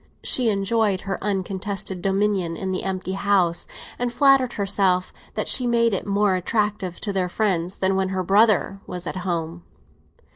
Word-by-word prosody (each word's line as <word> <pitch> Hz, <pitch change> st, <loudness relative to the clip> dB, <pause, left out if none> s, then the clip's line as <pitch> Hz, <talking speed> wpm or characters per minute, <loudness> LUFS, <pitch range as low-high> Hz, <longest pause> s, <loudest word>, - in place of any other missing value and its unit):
She 245 Hz, -3 st, +2 dB
enjoyed 200 Hz, -1 st, +1 dB
her 195 Hz, -1 st, -4 dB
uncontested 195 Hz, -1 st, -3 dB
dominion 195 Hz, -3 st, 0 dB
in 190 Hz, -1 st, -3 dB
the 185 Hz, -, -2 dB
empty 190 Hz, -1 st, -3 dB
house, 190 Hz, -3 st, +1 dB, 0.3 s
and 245 Hz, 0 st, -1 dB
flattered 260 Hz, -1 st, +4 dB
herself 195 Hz, -3 st, +1 dB, 0.2 s
that -, -, -1 dB
she 250 Hz, -, +3 dB
made 235 Hz, -2 st, +2 dB
it 195 Hz, -, -2 dB
more 200 Hz, 0 st, +2 dB
attractive 195 Hz, -1 st, -1 dB
to 205 Hz, -, -2 dB
their 185 Hz, -2 st, 0 dB
friends 185 Hz, -3 st, -1 dB
than 190 Hz, 0 st, 0 dB
when 190 Hz, 0 st, 0 dB
her 190 Hz, -1 st, -2 dB
brother 200 Hz, 0 st, +3 dB
was 180 Hz, 0 st, -5 dB
at 185 Hz, -, -4 dB
home. 170 Hz, -, -3 dB
195 Hz, 160 wpm, -23 LUFS, 185-210 Hz, 0.3 s, flattered